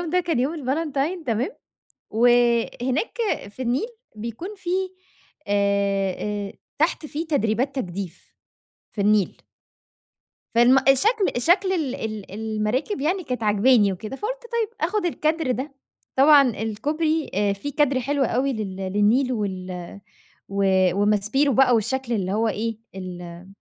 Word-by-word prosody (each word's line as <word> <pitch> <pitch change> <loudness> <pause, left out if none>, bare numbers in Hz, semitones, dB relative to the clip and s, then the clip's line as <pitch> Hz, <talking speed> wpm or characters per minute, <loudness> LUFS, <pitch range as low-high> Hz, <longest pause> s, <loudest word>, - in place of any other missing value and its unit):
اليوم 340 -3 -4
ده 360 +1 +3
كان 335 -7 -1
يوم 275 +6 0
الفالنتين 305 +3 -2
تمام، 235 - 0 0.6
وهناك 240 - +2 0.3
في 255 - -10
النيل 255 - 0 0.3
بيكون 235 - -6
في 345 - -7 0.8
آآ، 200 -1 +1 0.4
آآ، - - -13 0.3
تحت 315 0 +1
في 305 +2 -4
تدريبات 260 -2 0
تجديف. 185 -6 -6 0.6
في 205 - -3
النيل. 210 -2 +2 1.1
فم 245 +3 +6
الشكل 400 - +3
شكل 375 +2 +3
ال 305 -8 -1
ال 215 -2 -5
المراكب 220 - -2
يعني 350 +5 0
كانت 250 -4 -4
عاجباني 210 0 +4
وكده، 215 +8 -6
فقلت - - -4
طيب، 460 -2 0 0.2
آخد 410 -2 -1
الكادر 315 -3 0
ده. 265 +3 -3 0.4
طبعًا 280 -1 +7
الكوبري 295 +9 -1 0.2
في 285 +9 -5
كادر 280 -2 +2
حلو 280 +2 0
أوي 260 +3 0
لل 210 -5 -4
للنيل 210 +7 +2
وال 185 -3 -5 0.5
و 200 0 0 0.4
وماسبيرو 210 +8 +2
بقى 255 0 +5
والشكل 245 +3 -1
اللي 195 -4 -1
هو 225 +2 +1
إيه، 220 +1 -2 0.2
ال 180 -2 -8
245 Hz, 130 wpm, -23 LUFS, 210-295 Hz, 1.1 s, طبعًا